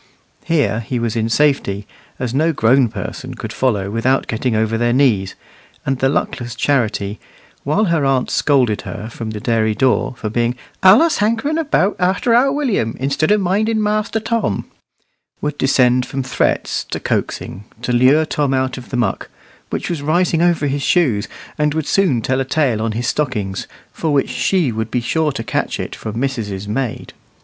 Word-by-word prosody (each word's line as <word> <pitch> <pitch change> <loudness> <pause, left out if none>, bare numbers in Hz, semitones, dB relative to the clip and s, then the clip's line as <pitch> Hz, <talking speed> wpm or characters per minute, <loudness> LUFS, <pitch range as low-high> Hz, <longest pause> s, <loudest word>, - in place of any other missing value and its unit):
Here 130 -10 +1
he 120 +2 -3
was 115 -1 -1
in 115 0 0
safety, 115 -7 +1 0.3
as 125 -2 -3
no 155 +5 +2
grown 125 0 +3
person - - -6
could - - -6
follow 105 -7 0
without 125 +4 +1
getting 115 +1 -1
over 110 +1 +1
their 120 +1 +1
knees; 120 -8 +2 0.5
and 135 -1 -1
the 135 - +3
luckless 120 -4 -2
Charity, 110 -6 0 0.4
while 175 +10 +1
her 165 -5 +1
aunt 135 -2 +1
scolded 125 -8 +2
her 110 - -7
from 110 0 -6
the 110 -1 -5
dairy 110 -1 +1
door, 130 +1 +1
for - - -4
being 120 +2 0 0.3
"allus 230 - +6
hankering 230 +9 +1
about 270 - +1
arter 190 +6 +2
our 255 +4 +4
Willum, 250 - -1
instead 140 +4 0
of 210 0 +3
minding 215 +4 +1
Master 215 +1 0
Tom," 220 - -1 0.7
would 150 -1 -3
descend 125 -2 +3
from 135 0 -3
threats 130 - 0
to - - -5
coaxing, 100 - -3 0.2
to - - -1
lure 130 +6 +4
Tom 145 -3 0
out 130 0 -1
of 125 - -13
the 125 - -2
muck, 110 -6 -1 0.4
which - - -3
was 170 -4 -3
rising 165 +2 +1
over 175 -3 +2
his 140 0 -1
shoes, 125 - +2 0.3
and 150 0 +1
would 160 -2 -1
soon 155 - +2
tell 130 +1 0
a - - +1
tale 130 -5 +1
on 110 -1 -1
his 120 +2 -2
stockings, 110 -10 -2 0.3
for 160 - -2
which 140 -2 +1
she 175 -9 +1
would 110 0 -3
be 125 - 0
sure 150 +6 0
to 125 -4 -5
catch - - -2
it - - -4
from 110 +1 -5
missus's 110 -7 -3
maid. 115 +2 -3
130 Hz, 180 wpm, -18 LUFS, 115-160 Hz, 0.7 s, allus